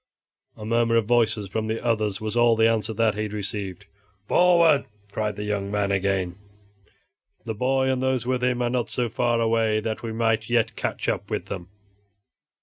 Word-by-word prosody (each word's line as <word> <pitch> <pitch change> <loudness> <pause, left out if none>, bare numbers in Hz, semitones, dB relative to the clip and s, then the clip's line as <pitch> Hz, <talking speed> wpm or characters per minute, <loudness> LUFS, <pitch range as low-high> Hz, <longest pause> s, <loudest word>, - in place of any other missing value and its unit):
A 105 - -8
murmur 115 +1 +2
of 115 -2 +3
voices 110 -3 +2
from 110 +3 -3
the 110 +2 -3
others 110 -4 0
was 110 0 -4
all 120 -1 +4
the 110 0 +4
answer 115 -1 +1
that 110 0 +1
he 110 +1 -2
received. 100 -2 -5 0.4
"Forward!" 170 -4 +4 0.3
cried 105 0 -2
the 105 - -5
young 105 -1 -2
man 100 -1 0
again, 95 -2 0 1.1
"the 110 - -3
boy 130 +4 +1
and 130 -1 0
those 130 -2 0
with 125 0 -1
him 125 -1 +1
are 120 - +1
not 125 -2 -1
so 120 -2 -1
far 120 +1 0
away 115 -1 +2
but - - -8
that 110 -1 -3
we 115 - -4
might 115 0 0
yet 120 -2 +1
catch - - -3
up - - -2
with - - -3
them." 90 -2 -6
110 Hz, 190 wpm, -24 LUFS, 105-120 Hz, 1.1 s, all